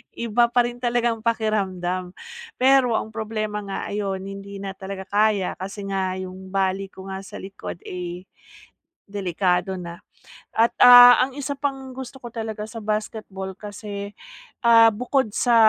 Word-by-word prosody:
iba 235 Hz, +1 st, +2 dB
pa 240 Hz, +1 st, +3 dB
rin 240 Hz, 0 st, -4 dB
talagang 240 Hz, -2 st, 0 dB
pakiramdam. 190 Hz, -5 st, -1 dB, 0.4 s
Pero 260 Hz, -2 st, +4 dB
ang 220 Hz, -, -2 dB
problema 215 Hz, -1 st, -3 dB
nga 195 Hz, -, -4 dB
ayon, 195 Hz, -2 st, -2 dB
hindi 195 Hz, 0 st, -8 dB
na 195 Hz, -1 st, -4 dB
talaga 190 Hz, 0 st, -6 dB
kaya 205 Hz, -2 st, +1 dB
kasi 195 Hz, +2 st, -6 dB
nga 190 Hz, -1 st, -1 dB
yung 185 Hz, 0 st, -8 dB
bali 195 Hz, 0 st, 0 dB
ko 190 Hz, 0 st, -11 dB
nga 190 Hz, -, -4 dB
sa -, -, -11 dB
likod 190 Hz, -3 st, -8 dB
eh, 180 Hz, 0 st, -6 dB, 0.9 s
delikado 185 Hz, -1 st, 0 dB
na. 170 Hz, -1 st, -8 dB, 0.6 s
At 230 Hz, +1 st, +4 dB
ah, 245 Hz, 0 st, +10 dB
ang 265 Hz, -, -14 dB
isa 285 Hz, 0 st, -3 dB
pang 270 Hz, -2 st, -3 dB
gusto 265 Hz, +1 st, -8 dB
ko 240 Hz, -2 st, -8 dB
talaga 220 Hz, -2 st, -4 dB
sa 225 Hz, 0 st, -8 dB
basketball 210 Hz, -2 st, -4 dB
kasi, 205 Hz, -1 st, -7 dB, 0.5 s
ah, 230 Hz, -1 st, +8 dB
bukod 250 Hz, +2 st, 0 dB
sa 240 Hz, -2 st, +3 dB
210 Hz, 150 wpm, -23 LUFS, 190-235 Hz, 0.9 s, ah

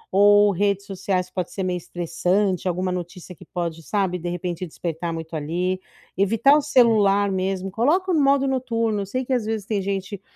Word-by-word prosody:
ou 205 Hz, +1 st, +6 dB
redes 200 Hz, +1 st, 0 dB
sociais, 185 Hz, -2 st, -2 dB
pode 180 Hz, -2 st, -3 dB
ser 190 Hz, -, -4 dB
meio 180 Hz, -1 st, -1 dB
estressante, 180 Hz, +3 st, -1 dB
alguma 185 Hz, +1 st, -1 dB
notícia 180 Hz, 0 st, -6 dB
que -, -, -15 dB
pode, 165 Hz, -2 st, -4 dB
sabe 190 Hz, -2 st, -1 dB
de 175 Hz, -, -4 dB
repente 175 Hz, 0 st, -4 dB
despertar 170 Hz, +1 st, -4 dB
muito 160 Hz, 0 st, -6 dB
ali, 180 Hz, +5 st, -2 dB, 0.4 s
evitar 225 Hz, +9 st, +4 dB
o -, -, +2 dB
celular 205 Hz, -7 st, +3 dB
mesmo, 190 Hz, 0 st, -2 dB
coloca 345 Hz, -, +1 dB
no 310 Hz, -, +3 dB
modo 275 Hz, 0 st, +3 dB
noturno, 230 Hz, -5 st, -1 dB
eu 195 Hz, -, -3 dB
sei 255 Hz, +6 st, -3 dB
que 260 Hz, -, -1 dB
às 245 Hz, -, +1 dB
vezes 220 Hz, -2 st, -3 dB
tem 210 Hz, -3 st, 0 dB
gente, 195 Hz, 0 st, -4 dB
195 Hz, 185 wpm, -23 LUFS, 180-215 Hz, 0.4 s, ou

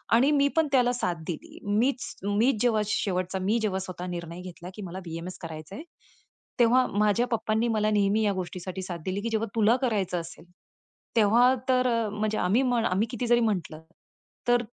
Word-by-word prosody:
आणि 270 Hz, +5 st, +4 dB
मी 280 Hz, -1 st, +4 dB
पण 320 Hz, -2 st, +3 dB
त्याला 250 Hz, -2 st, +3 dB
साथ 180 Hz, -7 st, -1 dB
दिली. 170 Hz, -, -7 dB, 0.2 s
मीच, 255 Hz, +2 st, 0 dB
मीच 220 Hz, +2 st, +2 dB
जेव्हा 225 Hz, -3 st, +3 dB
शेवटचा 185 Hz, -2 st, -1 dB
मी 210 Hz, +5 st, +1 dB
जेव्हा 200 Hz, -3 st, -1 dB
स्वतः 185 Hz, -1 st, -6 dB
निर्णय 170 Hz, 0 st, -6 dB
घेतला 180 Hz, -1 st, -9 dB
की 210 Hz, -, -8 dB
मला 185 Hz, +2 st, -6 dB
बी-एम-एस 165 Hz, +2 st, -6 dB
करायचंय. 160 Hz, -, -8 dB, 0.8 s
तेव्हा 250 Hz, +2 st, +5 dB
माझ्या 210 Hz, +4 st, +2 dB
पप्पांनी 220 Hz, 0 st, 0 dB
मला 215 Hz, -1 st, +1 dB
नेहमी 205 Hz, +1 st, +2 dB
या 205 Hz, -1 st, +2 dB
गोष्टीसाठी 185 Hz, 0 st, -5 dB
साथ 175 Hz, -2 st, -5 dB
दिली, 190 Hz, +2 st, -2 dB
की 230 Hz, -, -2 dB
जेव्हा 225 Hz, 0 st, -1 dB
तुला 225 Hz, +2 st, +4 dB
करायचं 205 Hz, -9 st, 0 dB
असेल, 165 Hz, +1 st, -11 dB, 0.7 s
तेव्हा 235 Hz, +4 st, +5 dB, 0.2 s
तर, 255 Hz, 0 st, +3 dB
अ, 230 Hz, -3 st, +1 dB
म्हणजे 215 Hz, +1 st, -2 dB
आम्ही, 200 Hz, +8 st, +2 dB, 0.3 s
आम्ही 205 Hz, +5 st, +1 dB
किती 240 Hz, 0 st, -3 dB
जरी 240 Hz, 0 st, +4 dB
म्हटलं 175 Hz, -8 st, -1 dB, 0.7 s
तर 245 Hz, 0 st, +3 dB
210 Hz, 175 wpm, -27 LUFS, 185-235 Hz, 0.8 s, तेव्हा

